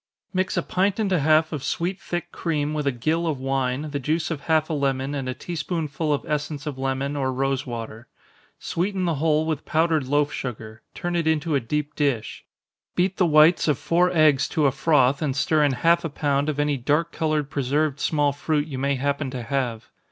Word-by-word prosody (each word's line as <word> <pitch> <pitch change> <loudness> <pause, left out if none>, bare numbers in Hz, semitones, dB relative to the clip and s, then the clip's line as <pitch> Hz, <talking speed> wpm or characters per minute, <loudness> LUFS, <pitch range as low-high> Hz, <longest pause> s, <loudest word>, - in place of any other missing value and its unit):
_ - - -70 0.3
Mix 185 0 0
a - - +1
pint 195 +2 0
and 205 -3 0
a 180 - +3
half 155 +2 +3
of 145 -3 -4
sweet 180 +3 -2
thick 175 0 -4
cream 150 -3 -2
with 150 -2 -2
a - - +3
gill 155 +8 -1
of 155 -4 -1
wine, 135 +2 -1
the 140 - -2
juice 155 +5 -1
of 150 -4 -3
half 155 0 +2
a 165 - -3
lemon, 135 -1 -1
and 135 -3 -3
a 130 - -3
tea 175 - -6
spoonful 155 -1 -2
of 145 - -1
essence 150 0 -3
of 145 -3 -5
lemon, 135 +2 -1
or 135 -2 0
rosewater. 125 -4 -3 0.5
Sweeten 185 +2 -2
the 170 - +1
whole 155 -1 +2
with 155 -2 -2
powdered 160 -3 +1
loaf 145 +1 +1
sugar 110 -3 -6
turn 175 0 -3
it 165 -2 0
into 160 0 +1
a 140 - +3
deep 150 +5 -3
dish. 140 -7 -1 0.5
Beat 185 +1 +1
the 180 - +3
whites 155 +2 +5
of 150 -4 +2
four 175 +2 +2
eggs 155 -5 +4
to 155 - +1
a 135 - +4
froth, 140 -1 +2
and 140 -4 -1
stir 150 +2 +2
in 145 -2 +3
half 170 +7 +3
a 165 - -2
pound 145 0 0
of 145 -1 -2
any 145 -1 +1
dark 150 +7 0
colored 155 -2 -1
preserved 145 +1 0
small 145 -2 +1
fruit 150 +1 -1
you 135 -4 -5
may 140 +1 +1
happen 140 +1 -1
to 130 -2 -5
have. 125 -3 -3
150 Hz, 215 wpm, -24 LUFS, 135-160 Hz, 0.5 s, whites